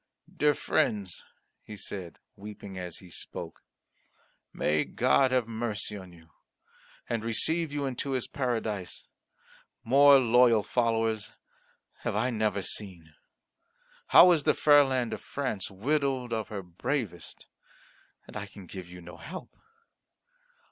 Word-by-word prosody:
"Dear 150 -1 +3
friends," 100 -8 -1 0.4
he 105 - -10
said, 95 -3 -7 0.2
weeping 100 -1 -9
as 90 -2 -5
he 90 -2 -13
spoke, - - -7 0.9
"may 75 0 +1
God 70 - +2
have 125 -3 +1
mercy 110 -2 -4
on 95 -3 -10
you 80 -1 -18 0.8
and 115 -2 -2
receive 160 +8 +2
you 145 -1 -2
into 135 +1 -3
His 130 -2 -1
Paradise! 110 -7 -3 0.7
More 140 +3 +7
loyal 120 -3 +4
followers 115 -2 0 0.7
have - - -3
I 125 - +1
never 105 -3 0
seen. 90 -8 -5 0.9
How 180 - +8
is 165 -4 +3
the - - +3
fair 145 -1 +6
land 130 -3 -1
of - - -6
France 130 -9 -3
widowed 130 +3 -1
of 110 -1 -2
her 100 -3 -6
bravest, 95 - -4 0.8
and - - -14
I 105 -1 -5
can 100 -1 -12
give 90 0 -9
you 90 0 -11
no 85 +1 -11
help. 175 +7 -9
110 Hz, 130 wpm, -29 LUFS, 95-130 Hz, 0.9 s, How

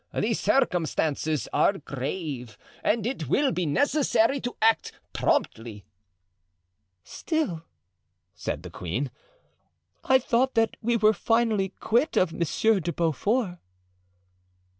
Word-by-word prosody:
The - - +1
circumstances 160 - 0
are 200 - +3
grave 140 -4 -5 0.3
and 220 -1 +1
it 195 - -3
will 280 - +3
be 180 -6 -1
necessary 275 - +2
to 245 - -4
act 225 0 +2 0.2
promptly." 110 -4 -1 1.2
"Still!" 310 - -2 0.7
said - - -5
the - - -9
queen. 115 - -3 0.9
"I 265 - +5
thought 255 +1 +1
that 225 0 +2
we 235 +1 +1
were 215 -1 +4
finally 225 -3 +1
quit 240 +7 +1
of 175 -3 +2
Monsieur 200 +5 +1
de 170 0 -2
Beaufort." 175 - 0
200 Hz, 110 wpm, -26 LUFS, 155-235 Hz, 1.2 s, I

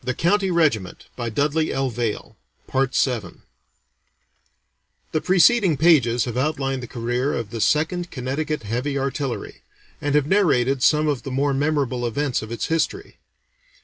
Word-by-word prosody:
[Illustration: 185 +9 +1 0.3
Monument 90 - -12
at 115 -2 -4 1.4
Arlington] 125 -7 0 1.7
The 155 - 0
preceding 190 - +4
pages 130 -8 +4
have 120 -2 -5
outlined 135 -1 -1
the 125 - -7
career 120 +4 -2
of 110 -3 -4
the 115 -2 -4
Second 170 - +1
Connecticut 145 +3 -3
Heavy 125 +7 -2
Artillery, 135 -1 -4 0.4
and 145 0 0
have 150 -2 +3
narrated 140 -8 +2
some 150 +3 +3
of 145 -4 0
the - - -7
more 140 +2 0
memorable 135 -4 0
events 135 +2 -1
of 110 - -8
its 115 - -3
history. 165 - -2
135 Hz, 125 wpm, -22 LUFS, 125-155 Hz, 1.7 s, preceding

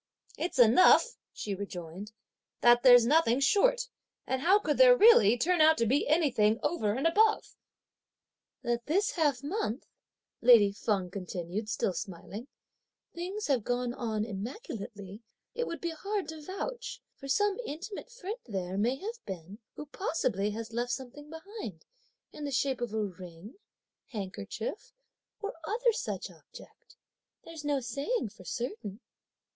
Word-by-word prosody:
"It's 345 - -3
enough," 250 - +6 0.2
she 205 - -5
rejoined, 185 0 -7 0.5
"that 240 0 +6
there's 245 -2 +8
nothing 275 -2 +3
short; - - +3 0.4
and 260 0 -2
how 370 +7 +5
could 310 -8 -1
there - - +8
really 320 - +7
turn 350 +6 +2
out 315 +1 +6
to 230 - +2
be 265 +6 +1
anything 245 -9 +3
over 220 -11 0
and 265 +6 -2
above?" 430 +6 +3 1.1
"That 235 0 -2
this 390 +7 +2
half 290 -6 0
month," 290 - -3 0.6
lady 230 -4 +7
Feng 200 -3 -2
continued 185 +2 -5
still 195 - 0
smiling, 200 +5 -7 0.7
"things 375 +5 -4
have 265 -6 +1
gone 245 +1 -1
on 220 -4 -2
immaculately 210 - -7 0.3
it 485 - -2
would 335 - -5
be 340 - -3
hard 400 +4 -3
to 320 -1 -7
vouch; 480 +9 -5 0.2
for 275 - -10
some 405 - +1
intimate 365 - -7
friend 440 -1 -6
there 190 -3 -3
may 240 +5 +2
have 445 - -7
been, 190 +2 -8 0.2
who 300 - -7
possibly 255 - -1
has 225 +1 -6
left 240 +1 -1
something 280 +3 -8
behind, 320 - -8 0.5
in 300 - -8
the 290 - -2
shape 270 -1 0
of 240 -3 -2
a 215 - 0
ring, 180 +2 -10 0.5
handkerchief 205 - -6 0.5
or 410 - -4
other 470 +7 +1
such - - -4
object, - - -16 0.5
there's 325 -2 -9
no 290 -1 +1
saying 270 - -2
for - - -14
certain!" 215 -1 -5
255 Hz, 145 wpm, -30 LUFS, 210-345 Hz, 1.1 s, there's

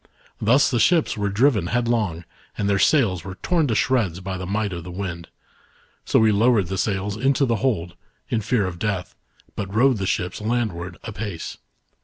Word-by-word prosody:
Thus 125 +6 +4
the 120 - +1
^hips 160 +7 +3
were 105 -2 -1
driven 105 -3 +2
headlong, 115 -7 0 0.3
and 100 - -1
their 100 -1 +2
sails 100 - +3
were 95 0 -7
torn 170 -4 +2
to 115 - 0
shreds 105 -9 +1
by 95 0 -5
the 90 -1 -5
might 105 0 -1
of 85 -1 -6
the 90 - -9
wind. 90 -2 -5 0.8
So - - +2
we 110 -1 +5
lowered 105 -3 +3
the 95 - -2
sails 100 0 -1
into 135 +4 +2
the 115 -3 +1
hold, 95 -9 -1 0.3
in 115 - -1
fear 110 -1 +1
of 90 -2 -5
death, 100 -4 -2 0.4
but 100 -1 -4
rowed 125 +4 +3
the 95 -1 -2
ships 90 +2 -2
landward, 105 -7 -2
apace. 100 -5 -6
105 Hz, 185 wpm, -23 LUFS, 95-120 Hz, 0.8 s, we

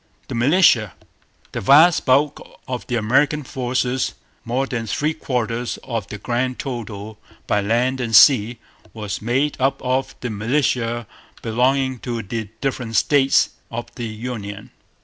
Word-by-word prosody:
The - - -4
Militia. 120 - +4 0.6
The - - -4
vast 150 - +5
bulk 140 +3 +3 0.3
of 125 -1 -5
the 120 - -1
American 140 +7 +2
forces, 125 0 -1 0.3
more 125 +4 -1
than 115 -4 -4
three 150 +8 0
quarters 120 -5 -2
of 115 -5 -4
the 105 - -7
grand 125 +4 -2
total 110 -5 -6 0.3
by 105 - +1
land 125 +5 0
and 115 -2 0
sea, 120 +1 +6 0.4
was 105 -3 -5
made 130 +6 0
up 135 +1 +1
of 130 +1 -1
the 125 - -3
militia 120 +1 0 0.4
belonging 130 +3 +1
to 120 -2 -4
the 110 +1 -5
different 125 -4 -3
States 140 +1 +3 0.2
of 120 0 -6
the 120 -2 -5
Union. 110 -2 -6
125 Hz, 140 wpm, -21 LUFS, 115-135 Hz, 0.6 s, sea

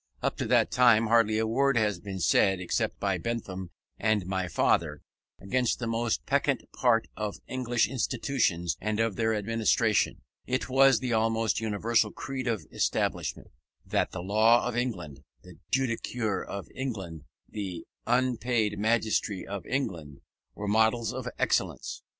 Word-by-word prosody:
Up - - 0
to - - -2
that - - +3
time 120 -3 +5
hardly 110 -1 +3
a 110 - +1
word 135 +4 +2
had 105 -5 +1
been 95 -2 -6
said, 95 +2 +3
except 90 - -2
by - - 0
Bentham 95 -6 -4 0.3
and 110 -3 +1
my 95 0 -2
father, 75 -2 +1 0.4
against 125 +5 0
that 120 - -4
most 115 0 -1
peccant 140 0 +1
part 120 -3 +2
of 105 -1 -4
English 120 -4 0
institutions 110 -8 0
and 110 +1 -1
of 115 -3 +1
their 110 -1 +1
administration. 110 +1 +1 0.2
It 130 +1 -1
was 135 -2 +5
the 125 -2 -1
almost 115 0 +1
universal 110 0 +1
creed 130 -2 -5
of 110 -9 -1 0.3
Englishmen, - - -2 0.3
that - - 0
the 85 - -6
law 110 +5 +4
of 125 - -3
England, 90 - -3 0.2
the - - -14
judicature 115 -5 -1
of 100 -1 -6
England, 95 - -5 0.2
the 95 -5 -6 0.2
unpaid 120 -3 +1
magistracy 110 -3 0
of 100 -1 -6
England, 85 - -3 0.3
were 105 - -5
models 110 +2 +2
of - - -5
excellence. - - -1
110 Hz, 145 wpm, -28 LUFS, 100-120 Hz, 0.4 s, time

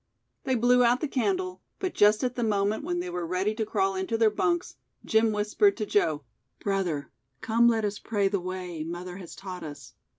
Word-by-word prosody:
They 260 -2 +1
blew 245 +1 +4
out 240 +1 +4
the 305 - -1
candle, 370 +7 -1 0.2
but 375 -2 -3
just 210 +2 +4
at 250 -1 0
the 240 - -2
moment 205 -1 +1
when 175 0 -1
they 180 - -5
were 175 0 -3
ready 185 +5 0
to 220 -1 -3
crawl 195 -2 +1
into 190 +4 -1
their 225 -1 +4
bunks, 345 +11 0 0.3
Jim 220 0 +3
whispered 210 - +2
to 215 - -2
Joe: 155 -8 +1 0.4
"Brother, 180 -8 -2 0.3
come 230 +1 +3
let 225 -2 +2
us 205 0 -3
pray 205 -3 0
the 200 0 0
way, 180 -3 -5
mother 175 +2 -6
has 180 -3 -10
taught 185 -2 -7
us." 150 -2 -9
210 Hz, 200 wpm, -27 LUFS, 185-235 Hz, 0.4 s, blew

